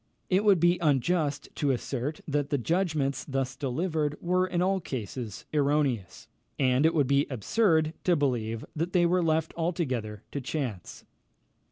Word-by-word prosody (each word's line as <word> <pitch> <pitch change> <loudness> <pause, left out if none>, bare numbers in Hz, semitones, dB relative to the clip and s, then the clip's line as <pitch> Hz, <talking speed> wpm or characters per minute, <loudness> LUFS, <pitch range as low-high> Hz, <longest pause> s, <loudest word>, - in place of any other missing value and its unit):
It 190 +3 +3
would 200 -4 +5
be 175 +1 +3
unjust 150 0 +1
to 145 - +1
assert, 135 +3 -2
that 145 -1 -1
the 145 - +1
judgments 150 -2 0
thus 135 -2 -2
delivered 150 +2 -1
were, 180 +1 +1
in 180 -1 -1
all 190 +2 +2
cases, 120 - -6
erroneous; 140 - 0 0.3
and 130 +2 +3
it 165 - 0
would 145 -3 +3
be 140 +2 +2
absurd 160 - +2
to 180 - +4
believe 115 -6 -1
that 165 +3 -2
they 175 -2 +4
were 180 +1 +3
left 160 -1 +1
altogether 130 - -2
to 140 - -3
chance. 130 - -5
150 Hz, 155 wpm, -28 LUFS, 130-170 Hz, 0.3 s, would